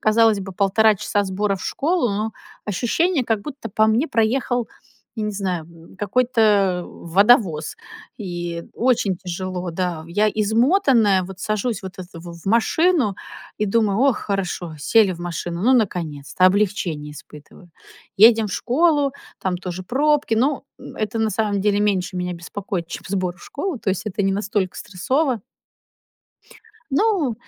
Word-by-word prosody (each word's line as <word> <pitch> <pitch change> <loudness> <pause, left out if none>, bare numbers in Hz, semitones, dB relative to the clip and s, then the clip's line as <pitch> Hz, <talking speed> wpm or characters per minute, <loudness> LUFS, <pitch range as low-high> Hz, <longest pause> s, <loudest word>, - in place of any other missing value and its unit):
Казалось 220 -1 +4
бы, 195 0 -7
1,5 210 +3 +3
часа 205 +1 -1
сбора 195 +1 -1
в 185 - -10
школу, 320 -3 0
но 215 +2 -2 0.3
ощущение, 260 - 0
как 225 -3 0
будто 285 -2 -7
по 215 +2 +2
мне 235 +8 +2
проехал, 240 0 0 0.5
я 220 - -2
не 210 - -1
знаю, 185 -4 -2
м, 170 +2 -17
какой-то 205 -4 +2
водовоз 185 -3 +2 0.4
и 175 -3 -5
очень 225 -6 +1
тяжело, 180 0 -4
да. 170 -2 -3
Я 210 +5 +2
измотанная 220 - +3
вот 190 +1 -9
сажусь 215 +2 -2
вот 190 0 -8
это 180 -2 -10
в 170 0 -9
в - - -18
машину 235 - +2 0.4
и 210 - +1
думаю: 210 0 +1
"О, 275 -1 +5
хорошо! 185 -6 -3
Сели 200 +6 +4
в 175 - -9
машину. 175 +1 -4
Ну 255 - +4
наконец-то! 175 - +1
Облегчение 185 -7 0
испытываю". 150 +4 -14 0.5
Едем 220 +1 +6
в - - -6
школу, 290 +1 +2 0.3
там 185 -1 -1
тоже 180 0 -6
пробки. 290 0 +1
Но, 270 +5 +1 0.2
м, - - -11
это, 220 +1 -2
на 220 -1 +1
самом 205 -3 0
деле, 205 0 +2
меньше 190 -3 0
меня 180 0 -2
беспокоит, 175 0 -5
чем - - -7
сбор 185 -2 -2
в - - -18
школу. 325 -1 -4
То 200 - -1
есть 190 +3 -3
это 205 0 -3
не 195 0 +2
настолько 200 -2 -1
стрессово. 250 - -1 1.5
Ну, 300 - +1
205 Hz, 155 wpm, -21 LUFS, 180-230 Hz, 1.5 s, Едем